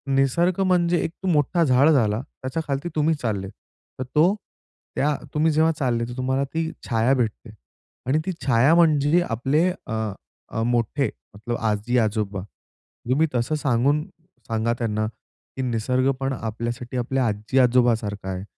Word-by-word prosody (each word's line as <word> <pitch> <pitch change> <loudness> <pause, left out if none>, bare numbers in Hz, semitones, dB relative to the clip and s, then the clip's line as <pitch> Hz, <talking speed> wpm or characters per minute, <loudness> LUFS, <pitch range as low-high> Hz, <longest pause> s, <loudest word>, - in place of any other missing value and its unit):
निसर्ग 170 +7 +2
म्हणजे 175 -2 +2
एक 165 - -2 0.2
मोठा 170 +1 +2
झाड 135 +1 +4
झाला, 115 -7 +2
त्याच्या 130 +3 -5
खालती 140 +4 -2
तुम्ही 155 +1 +2
चाललेत. 100 -8 -3 0.5
तर - - -1
तो 170 +7 +5 0.6
त्या 150 +1 +1 0.2
तुम्ही 155 +1 +2
जेव्हा 160 +1 +3
चालले 120 -3 0
तर 120 +1 -8
तुम्हाला 130 +1 0
ती 165 0 -1 0.2
छाया 115 +3 +3
भेटते 115 -2 -2 0.6
आणि 140 +4 +2
ती 190 - -1
छाया 135 +4 +4
म्हणजे 155 0 +4
आपले 135 +9 +1 0.2
अ, 110 0 -5
मोठे 120 +4 0 0.3
मतलब 120 +3 -4
आजी-आजोबा 110 -2 0 0.7
तुम्ही 150 +6 +3
तसं 120 +6 0
सांगून 140 +1 +1 0.4
सांगा 115 +1 0
त्यांना 110 -2 -1 0.5
की 130 - -3
निसर्ग 125 +2 +1
पण 135 0 -1
आपल्यासाठी 120 +1 -4
आपल्या 130 +1 0
आजी-आजोबा 120 +3 +3
सारखा 105 -3 -6
आहे. 95 0 -4
130 Hz, 140 wpm, -23 LUFS, 115-150 Hz, 0.7 s, तो